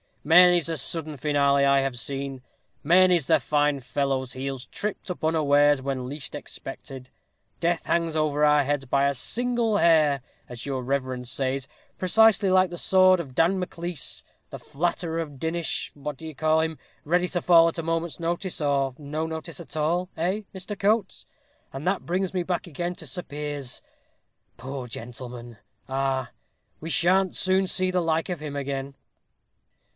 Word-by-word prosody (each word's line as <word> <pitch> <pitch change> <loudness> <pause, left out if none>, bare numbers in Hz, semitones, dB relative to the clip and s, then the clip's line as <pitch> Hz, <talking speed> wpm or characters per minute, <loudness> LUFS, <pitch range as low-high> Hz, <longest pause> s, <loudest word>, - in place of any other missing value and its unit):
many's 175 +1 +6
the 165 -1 -3
sudden 155 +2 -3
finale 140 0 +2
I 140 0 +4
have 135 -2 -2
seen. 135 +1 -4 0.4
Many's 175 -1 +4
the 160 -2 +5
fine 145 0 +1
fellow's 130 0 -2
heels 135 -1 -5
tripped 210 -2 -5
up 180 - -7
unawares, 145 -2 +4
when 130 -2 -3
least 135 -3 -7
expected. 130 -1 -8 0.5
Death 170 0 0
hangs 165 -2 0
over 150 -1 +1
our 150 -1 +5
heads 140 0 -1
by 140 +2 +2
a 140 - +1
single 235 - 0
hair, 155 -6 +4 0.3
as 120 -2 -8
your 135 -2 -3
reverence 130 -2 -2
says, 135 0 -2 0.3
precisely 205 +1 +4
like 185 -1 +4
the 175 - -5
sword 185 -1 +5
of 135 -7 -7
Dan 175 +6 +3
Maclise, 175 -3 -5 0.3
the - - -7
flatterer 165 +1 -2
of 145 -5 -6
Dinnish 165 +2 -2
what 145 -1 -6
do 160 - -10
you 155 - -7
call 155 +2 +2
him, 160 -1 -3 0.2
ready 175 +4 +1
to 175 - -1
fall 170 -2 +6
at 165 - -2
a - - -3
moment's 165 +1 -2
notice, 170 +3 -2
or 140 -3 0
no 155 +2 -3
notice 160 +1 -6
at 165 -2 -9
all 170 +4 0
eh? 185 +6 0
Mr. 190 +2 -6
Coates. 205 0 0 0.4
And 135 +2 -7
that 190 +2 -1
brings 185 +2 -1
me 185 - 0
back 175 0 -2
again 175 +2 -4
to - - -10
Sir 180 - -2
Piers 145 -2 -6 0.7
poor 130 +1 -6
gentleman 120 0 -8 0.3
ah! 135 -1 -1 0.5
we 160 - -6
sha'n't 180 +5 +2
soon 190 0 +2
see 185 0 +1
the 180 -1 +1
like 165 0 0
of 175 -3 -3
him 150 -1 -6
again!" 140 -1 -4
155 Hz, 165 wpm, -25 LUFS, 135-175 Hz, 0.7 s, many's